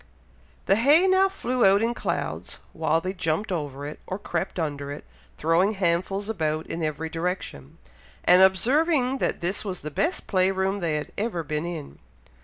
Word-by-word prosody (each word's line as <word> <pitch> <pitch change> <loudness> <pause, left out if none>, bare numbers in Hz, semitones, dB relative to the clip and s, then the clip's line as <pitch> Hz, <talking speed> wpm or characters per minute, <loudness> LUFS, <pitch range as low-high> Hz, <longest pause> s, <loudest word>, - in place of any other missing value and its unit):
The 195 - +4
hay 290 +10 +5
now 380 +1 +4
flew 255 -10 -3
about 195 +2 +5
in 235 +1 +1
clouds, - - -3 0.2
while 160 0 +1
they 185 +2 -3
jumped 170 +3 -1
over 145 -5 -3
it, 150 - -7
or 185 - -3
crept 190 -2 -3
under 145 -4 -3
it, 145 - -7 0.3
throwing 175 - +2
handfuls 190 +1 0
about 160 -7 -1
in 165 - -5
every 155 0 -2
direction, 165 - -4 0.5
and 180 +1 +6
observing 260 - +3
that - - -1
this 180 +5 -2
was 190 -4 -5
the 150 - -6
best 325 - -1
play 185 -1 +2
room 195 +1 0
they 165 -4 -1
had 150 - -4
ever 205 -6 -2
been 155 +2 -3
in. 160 -5 -7
185 Hz, 175 wpm, -25 LUFS, 160-210 Hz, 0.5 s, and